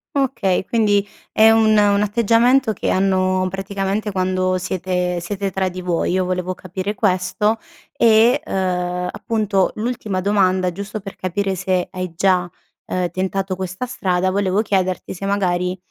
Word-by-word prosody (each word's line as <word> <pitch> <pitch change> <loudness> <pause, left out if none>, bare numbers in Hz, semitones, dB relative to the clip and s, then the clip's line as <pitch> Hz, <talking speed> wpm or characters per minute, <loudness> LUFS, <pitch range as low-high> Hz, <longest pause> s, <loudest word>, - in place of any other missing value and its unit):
Okay, 245 -10 0
quindi 205 -3 +2 0.2
è 220 +1 +6
un 225 0 +4
un 205 -1 +4
atteggiamento 230 +3 +3
che - - -3
hanno 185 -1 +2
praticamente 195 +2 -3
quando 185 -1 0
siete 180 -1 -2
siete 195 +3 -3
tra 190 0 -1
di 185 0 -7
voi. 175 -1 -1
Io 185 0 +1
volevo 180 0 -2
capire 185 +3 -5
questo 210 +2 +1 0.4
e 230 +4 +4
uhm, 180 - -2
appunto, 210 -3 0
l'ultima 220 -4 -2
domanda, 185 -2 +2
giusto 200 +4 -6
per 195 -1 -9
capire 195 +2 -2
se 185 -1 -1
hai 185 -1 -4
già, 180 -1 +2 0.4
ehm, 180 -2 -2
tentato 190 +1 -2
questa 185 +5 -4
strada, 185 -6 0
volevo 195 +1 +1
chiederti 185 -3 -1
se 190 +1 -6
magari, 180 -2 0
190 Hz, 145 wpm, -20 LUFS, 185-205 Hz, 0.4 s, è